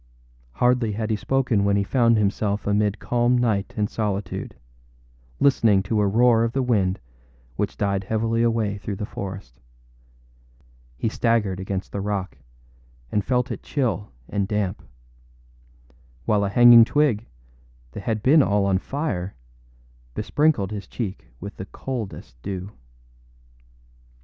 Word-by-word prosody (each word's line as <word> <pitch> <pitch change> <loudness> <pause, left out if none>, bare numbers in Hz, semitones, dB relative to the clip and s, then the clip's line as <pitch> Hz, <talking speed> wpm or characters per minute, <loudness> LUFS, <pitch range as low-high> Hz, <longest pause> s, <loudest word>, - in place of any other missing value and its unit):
Hardly 125 - +2
had 110 +1 -2
he - - +2
spoken 125 -2 +1
when 100 0 +2
he 100 - +2
found 115 +1 +3
himself 105 0 0
amid 105 0 +1
calm 120 +2 +1
night 110 -5 0
and 105 -1 +1
solitude, 100 -4 -3 0.8
listening 115 -8 +4
to 105 +2 0
a 105 - +3
roar 115 +2 +4
of 115 0 -1
the 135 - 0
wind 100 -7 +1 0.6
which - - -2
died 100 -1 -1
heavily 115 +2 0
away 110 -3 0
through 100 0 -4
the 105 +2 -4
forest. 95 -11 -7 1.4
He - - -1
staggered 110 -4 +1
against 95 0 -4
the 100 - -3
rock, 100 -2 -3 0.8
and 105 - +1
felt 125 +1 0
it - - -5
chill 125 -7 -2 0.2
and 100 -2 -1
damp; 105 -2 -2 1.4
while 105 -1 +2
a - - -1
hanging 120 +2 +8
twig, 120 -4 +1 0.6
that 105 - -7
had 110 +1 -2
been 150 +4 +6
all 100 -5 +2
on 95 -1 +2
fire, 105 - -3 0.8
besprinkled 145 -10 +1
his 100 -2 -6
cheek 100 - -5
with 100 +2 -8
the 95 - -6
coldest 110 - -6
dew. 95 0 -5
105 Hz, 135 wpm, -23 LUFS, 100-120 Hz, 1.4 s, hanging